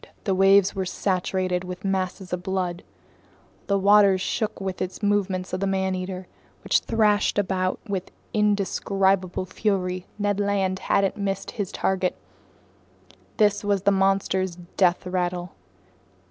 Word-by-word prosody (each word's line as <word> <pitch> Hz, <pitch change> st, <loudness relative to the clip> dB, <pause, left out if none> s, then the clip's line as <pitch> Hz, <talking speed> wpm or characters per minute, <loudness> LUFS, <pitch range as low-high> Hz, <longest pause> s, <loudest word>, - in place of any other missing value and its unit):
The 195 Hz, -, +1 dB
waves 195 Hz, +1 st, +5 dB
were 195 Hz, -, -2 dB
saturated 185 Hz, -1 st, -1 dB
with 180 Hz, +1 st, -7 dB
masses 190 Hz, -1 st, -2 dB
of 180 Hz, -, -2 dB
blood. 180 Hz, -2 st, -2 dB, 0.9 s
The 200 Hz, -, +2 dB
waters 200 Hz, -1 st, +5 dB
shook 215 Hz, +3 st, -2 dB
with 190 Hz, -1 st, -3 dB
the 185 Hz, 0 st, -4 dB
movements 190 Hz, -3 st, 0 dB
of 185 Hz, -, -1 dB
the 195 Hz, -, 0 dB
man 190 Hz, -1 st, 0 dB
eater, 185 Hz, 0 st, -4 dB, 0.4 s
which -, -, +3 dB
thrashed 210 Hz, -3 st, +2 dB
about 185 Hz, -2 st, 0 dB
with 190 Hz, -3 st, -3 dB, 0.2 s
indescribable 195 Hz, -3 st, +1 dB
fury. 185 Hz, -2 st, -1 dB
Ned 205 Hz, -1 st, 0 dB
Land 195 Hz, -2 st, 0 dB
hadn't 195 Hz, 0 st, +1 dB
missed 195 Hz, -1 st, -3 dB
his 205 Hz, -4 st, -4 dB
target. 185 Hz, -1 st, 0 dB, 1.2 s
This 205 Hz, -2 st, +3 dB
was 200 Hz, -2 st, 0 dB
the 200 Hz, -, +4 dB
monster's 190 Hz, -2 st, +1 dB, 0.2 s
death 180 Hz, -2 st, +2 dB
rattle. 180 Hz, -1 st, -2 dB
190 Hz, 130 wpm, -24 LUFS, 185-200 Hz, 1.2 s, waves